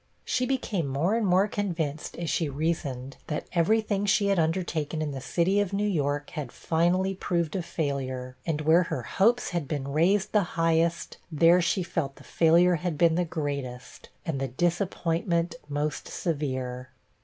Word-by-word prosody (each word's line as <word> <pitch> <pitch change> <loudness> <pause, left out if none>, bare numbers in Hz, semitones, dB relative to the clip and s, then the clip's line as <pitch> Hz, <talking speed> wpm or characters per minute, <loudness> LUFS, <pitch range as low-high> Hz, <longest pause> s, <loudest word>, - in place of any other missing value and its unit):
She 255 0 0
became 220 - -1
more 145 +9 0
and 225 -3 +1
more 185 +3 +4
convinced, 165 -8 -3
as 170 - -3
she 160 -1 0
reasoned, 140 -3 -3
that 150 - -3
every 185 +6 +3
thing 205 -1 -1
she 205 0 +3
had 195 -3 +2
undertaken 160 -2 -1
in 155 -2 -2
the 135 -1 -5
city 180 +8 +1
of 200 -1 -1
New 205 +1 +1
York 145 -5 -1
had 145 -5 -5
finally 175 +4 +1
proved 170 -4 -1
a 190 - 0
failure; 135 -6 -3
and 155 0 -1
where 160 +3 +5
her 125 - -2
hopes 225 - +2
had 170 -5 -2
been 140 -2 -3
raised 180 +7 +2
the 210 - +4 0.2
highest, 165 -1 +1
there 165 +3 +5
she 170 +2 +1
felt 165 -6 -3
the - - -15
failure 170 +2 +4
had 165 -1 -3
been 170 0 +4
the 175 +1 +1
greatest, 140 -6 -5 0.2
and 155 -5 -2
the 135 - 0
disappointment 170 - 0 0.2
most 145 0 -2
severe. 130 -6 -3
165 Hz, 170 wpm, -27 LUFS, 145-180 Hz, 0.2 s, where